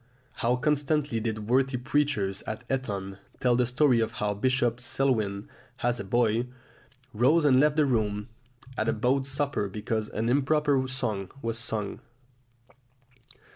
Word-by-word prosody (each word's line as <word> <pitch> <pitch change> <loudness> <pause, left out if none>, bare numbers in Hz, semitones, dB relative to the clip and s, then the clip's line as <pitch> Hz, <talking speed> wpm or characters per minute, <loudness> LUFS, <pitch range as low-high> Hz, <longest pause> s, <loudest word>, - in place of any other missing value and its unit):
How 120 +2 +1
constantly 145 -1 0
did 110 -2 -3
worthy 130 +2 +2
preachers 125 -7 0
at 110 +2 -5
Eton 100 -7 -4 0.2
tell 125 -1 +3
the 125 0 +2
story 125 -1 +3
of 110 0 -1
how 105 -4 -1
Bishop 120 +2 +1
Selwyn, 110 -6 0 0.4
as 120 0 +1
a - - -3
boy, 115 +3 +1 0.7
rose 145 +9 +3
and 130 -3 +5
left 150 +1 +3
the 155 -1 +4
room 105 -5 0 0.5
at 110 +1 +1
a - - +2
boat 130 +4 +1
supper 135 -6 -1
because 110 +1 -3
an 110 +2 -2
improper 140 +1 +2
song 110 -8 -2
was 115 0 -1
sung! 110 -3 -2
120 Hz, 140 wpm, -27 LUFS, 110-135 Hz, 0.7 s, and